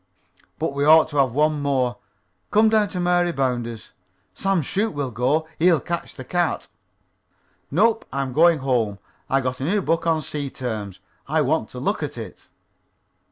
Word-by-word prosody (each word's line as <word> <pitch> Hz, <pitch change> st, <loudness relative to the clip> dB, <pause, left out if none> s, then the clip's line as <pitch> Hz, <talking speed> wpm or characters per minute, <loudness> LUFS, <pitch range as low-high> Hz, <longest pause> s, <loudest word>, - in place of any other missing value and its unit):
"But -, -, -2 dB
we 140 Hz, 0 st, -1 dB
ought 155 Hz, +1 st, +6 dB
to 145 Hz, -, -5 dB
have 135 Hz, -4 st, +3 dB
one 150 Hz, +1 st, +1 dB
more. 130 Hz, -4 st, 0 dB, 0.5 s
Come 220 Hz, +1 st, +4 dB
down 215 Hz, -1 st, +3 dB
to 180 Hz, -, -4 dB
Mary 175 Hz, 0 st, +2 dB
Bounder's. 120 Hz, -6 st, -3 dB, 0.4 s
Sam 195 Hz, -, 0 dB
Shoop 200 Hz, +5 st, -1 dB
will 140 Hz, -3 st, -2 dB
go. 135 Hz, +8 st, 0 dB
He'll 170 Hz, -1 st, +4 dB
catch 170 Hz, +3 st, -5 dB
the 130 Hz, -, -8 dB
cat." 175 Hz, +1 st, -1 dB, 1.0 s
"Nope. 225 Hz, +8 st, +2 dB
I'm 135 Hz, -2 st, -2 dB
going 165 Hz, +2 st, +5 dB
home. 115 Hz, -6 st, +1 dB, 0.3 s
I 135 Hz, 0 st, +2 dB
got 130 Hz, 0 st, -3 dB
a -, -, -4 dB
new 195 Hz, +8 st, +1 dB
book 165 Hz, +1 st, 0 dB
on 160 Hz, -2 st, +1 dB
sea 145 Hz, -1 st, -3 dB
terms, 110 Hz, -7 st, -5 dB, 0.3 s
and -, -, -1 dB
I -, -, +4 dB
want -, -, 0 dB
to -, -, -8 dB
look -, -, -1 dB
at -, -, -4 dB
it." -, -, -9 dB
145 Hz, 175 wpm, -23 LUFS, 130-175 Hz, 1.0 s, ought